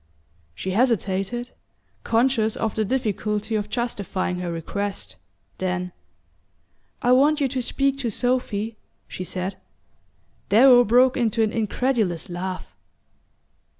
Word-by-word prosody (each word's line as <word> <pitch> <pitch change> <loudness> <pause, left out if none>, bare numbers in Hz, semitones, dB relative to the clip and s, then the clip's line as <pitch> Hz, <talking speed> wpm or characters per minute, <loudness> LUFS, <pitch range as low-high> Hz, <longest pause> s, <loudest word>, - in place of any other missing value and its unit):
She 185 - -4
hesitated, 230 +1 0 0.5
conscious 230 -2 +2
of 220 -2 -1
the 220 - 0
difficulty 215 -2 -1
of 210 -1 -1
justifying 200 -6 -2
her 175 -1 -3
request; 195 - -4 0.4
then: 180 -1 -2 1.1
"I 245 - +3
want 290 +4 +5
you 280 - +2
to 260 0 -2
speak 275 +2 0
to 245 -4 -1
Sophy," 225 -2 -1 0.3
she 185 - -6
said. 185 +2 -4 0.9
Darrow 245 +3 +7
broke 250 +3 +4
into 225 -2 +2
an 215 - +1
incredulous 220 -5 -1
laugh. 185 +1 -5
220 Hz, 115 wpm, -23 LUFS, 195-245 Hz, 1.1 s, Darrow